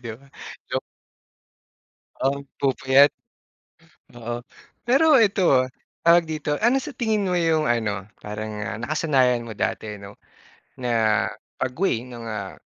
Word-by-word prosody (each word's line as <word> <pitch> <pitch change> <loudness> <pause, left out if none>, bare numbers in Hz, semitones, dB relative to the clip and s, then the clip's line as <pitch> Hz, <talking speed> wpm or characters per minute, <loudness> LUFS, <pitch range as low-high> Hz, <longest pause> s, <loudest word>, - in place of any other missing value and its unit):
di 115 - -4
ba? 140 - -21 0.4
Joke. - - 0 1.4
Um, 140 +1 0 0.2
pupuyat. 135 +1 +5 1.1
Oo, 120 0 -5 0.5
pero 280 +3 +5
eto, 185 - +4
ah, - - -7 0.4
tawag 170 0 +6
dito, 155 -1 -2
ano 245 +5 +4
sa 275 - -8
tingin 215 -4 0
mo 180 - 0
yung 165 -3 +2
ano, 105 -4 -1 0.2
parang 105 0 -5 0.2
nakasanayan 130 -3 +1
mo 115 - -8
dati 105 -1 -3
'no 100 0 -11 0.6
na 115 -4 +2 0.3
pag-way 125 -3 -1
ng, 120 -2 -9
ah, 105 -3 -5
130 Hz, 125 wpm, -23 LUFS, 115-170 Hz, 1.4 s, tawag